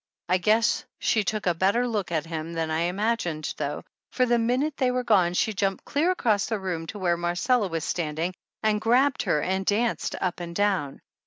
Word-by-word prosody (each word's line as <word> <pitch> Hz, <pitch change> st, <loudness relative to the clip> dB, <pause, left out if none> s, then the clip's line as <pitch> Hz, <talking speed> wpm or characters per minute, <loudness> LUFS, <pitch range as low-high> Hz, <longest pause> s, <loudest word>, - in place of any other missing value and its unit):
I 185 Hz, +1 st, +2 dB
guess 220 Hz, +5 st, +2 dB
she 220 Hz, -, +1 dB
took 215 Hz, +1 st, -2 dB
a 175 Hz, -, +3 dB
better 200 Hz, +8 st, +2 dB
look 210 Hz, -7 st, -2 dB
at 160 Hz, -2 st, 0 dB
him 165 Hz, 0 st, -5 dB
than 165 Hz, -1 st, -2 dB
I 160 Hz, +2 st, +1 dB
imagined 180 Hz, -4 st, -1 dB
though, 145 Hz, -1 st, -3 dB, 0.3 s
for 255 Hz, -, +2 dB
the 240 Hz, -1 st, +2 dB
minute 255 Hz, +6 st, 0 dB
they 260 Hz, -2 st, +1 dB
were 250 Hz, 0 st, 0 dB
gone 185 Hz, -7 st, +3 dB
she 220 Hz, -, +1 dB
jumped 195 Hz, -1 st, -1 dB
clear 310 Hz, +5 st, +1 dB
across 220 Hz, -, +1 dB
the 220 Hz, -, -1 dB
room 175 Hz, -4 st, -4 dB
to 210 Hz, -, -6 dB
where 175 Hz, -3 st, +1 dB
Marcella 180 Hz, +7 st, +1 dB
was 165 Hz, -3 st, -3 dB
standing 165 Hz, +2 st, -2 dB, 0.3 s
and 215 Hz, -1 st, +2 dB
grabbed 255 Hz, +5 st, +3 dB
her 150 Hz, -, +1 dB
and 190 Hz, +1 st, 0 dB
danced 220 Hz, +4 st, 0 dB
up 185 Hz, -2 st, -2 dB
and 170 Hz, -1 st, -6 dB
down. 190 Hz, -9 st, 0 dB
195 Hz, 200 wpm, -26 LUFS, 170-230 Hz, 0.3 s, a